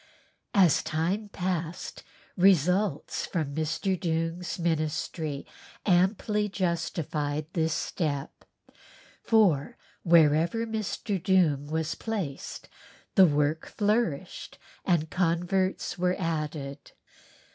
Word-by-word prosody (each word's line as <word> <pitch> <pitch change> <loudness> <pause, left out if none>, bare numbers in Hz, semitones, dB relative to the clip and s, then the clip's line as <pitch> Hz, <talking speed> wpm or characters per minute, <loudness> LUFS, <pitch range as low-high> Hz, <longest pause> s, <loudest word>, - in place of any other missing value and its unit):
As 185 -7 +5
time 185 +7 -1
passed, 175 -3 -3 0.3
results 180 -1 +2
from 155 -6 -2
Mr. 160 +5 -1
Doong's 165 0 -2
ministry 155 -2 -2 0.4
amply 210 +3 +2
justified 165 -5 -2
this 160 -2 +1
step, 145 -4 -3 0.8
for 190 -11 +3 0.2
wherever 165 +6 +4
Mr. 215 -3 -3
Doong 160 -6 +2
was 160 0 -1
placed 195 -12 -5 0.5
the 190 -2 +7
work 150 +1 0
flourished 205 -6 -1 0.3
and 160 -4 +1
converts 180 +2 0
were 180 0 +2
added. 155 -5 -4
170 Hz, 85 wpm, -28 LUFS, 155-190 Hz, 0.8 s, the